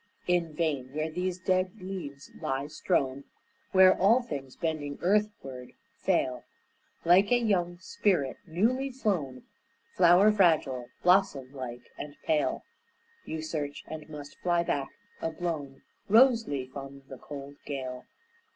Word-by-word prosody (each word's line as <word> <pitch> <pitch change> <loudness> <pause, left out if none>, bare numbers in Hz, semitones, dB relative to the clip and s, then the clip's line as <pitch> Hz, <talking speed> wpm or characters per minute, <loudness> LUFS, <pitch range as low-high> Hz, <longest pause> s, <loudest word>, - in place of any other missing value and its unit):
In 170 -3 +1
vain 145 -6 -1
where 155 +1 -1
these 180 +2 -2
dead 185 +2 0
leaves 180 -7 -7
lie 135 +1 -1
strown 140 -3 -1 0.5
Where 190 -1 +7
all 225 +7 +4
things, 135 - -6
bending 150 -3 -3
earthward, 180 -11 -1 0.3
fail, 125 -1 0 0.6
Like 185 +5 +5
a 245 - +6
young 180 -7 +1
spirit 180 -5 0
newly 240 +11 +1
flown, 180 - -2 0.5
Flower 180 +4 +6
fragile, 155 -11 +2 0.2
blossom 180 -8 +3
like 125 -3 -7
and 145 0 -7
pale, 155 -2 +1 0.6
You 160 0 -4
search; 150 -3 -4
and 155 0 -8
must 145 -2 -9
fly 175 -1 +2
back, 140 -5 -1 0.3
a - - 0
blown 160 -5 -4 0.3
Rose 230 +1 +6
leaf 130 -2 -4
on 140 0 -8
the 130 -1 -10
cold 140 -1 -9
gale. 130 -3 -5
160 Hz, 130 wpm, -29 LUFS, 140-185 Hz, 0.6 s, Where